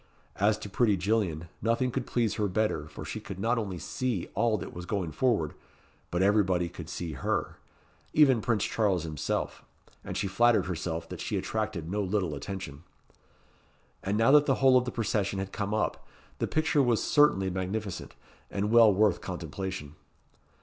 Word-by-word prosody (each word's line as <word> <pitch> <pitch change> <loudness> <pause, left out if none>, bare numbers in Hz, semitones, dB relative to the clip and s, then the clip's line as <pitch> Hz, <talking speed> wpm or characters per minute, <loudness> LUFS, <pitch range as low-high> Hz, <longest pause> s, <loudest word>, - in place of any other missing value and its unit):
As 105 +2 +3
to 105 - -7
pretty 105 0 +2
Gillian, 90 -4 0
nothing 115 +3 +1
could 130 0 -3
please 115 -3 +1
her 105 -2 0
better, 95 -6 0
for - - -9
she - - -5
could 95 -2 -8
not 115 +4 +1
only 100 -5 -4
see 115 0 -3
all 115 -2 +2
that - - -7
was 90 0 -7
going 95 -6 -2
forward, 105 - +1 0.6
but 85 +2 +1
everybody 95 -4 +3
could - - -9
see 85 -2 -4
her 70 - -2 0.5
even 135 -6 +5
Prince 110 -2 +1
Charles 100 -6 +1
himself; 75 -3 -3 0.4
and - - -5
she 100 - -1
flattered 120 +4 +3
herself 85 -2 -3
that - - -7
she - - -2
attraeted 105 -7 -3
no 105 +1 0
little 95 -4 -1
attention. 75 -2 -6 1.2
And 100 +2 -1
now 115 +4 +4
that 145 0 +6
the 135 - +4
whole 130 -1 +5
of 125 -1 +4
the 125 - -3
procession 105 -3 -1
had 95 0 -4
come 100 -1 -2
up, 110 0 -1 0.4
the - - 0
picture 155 -2 +2
was 120 -4 +2
certainly 95 -11 +4
magnificent, 95 +2 -4 0.3
and 100 +2 -1
well 115 -2 +7
worth 100 -1 +2
contemplation. 90 -2 -5
100 Hz, 170 wpm, -29 LUFS, 90-115 Hz, 1.2 s, well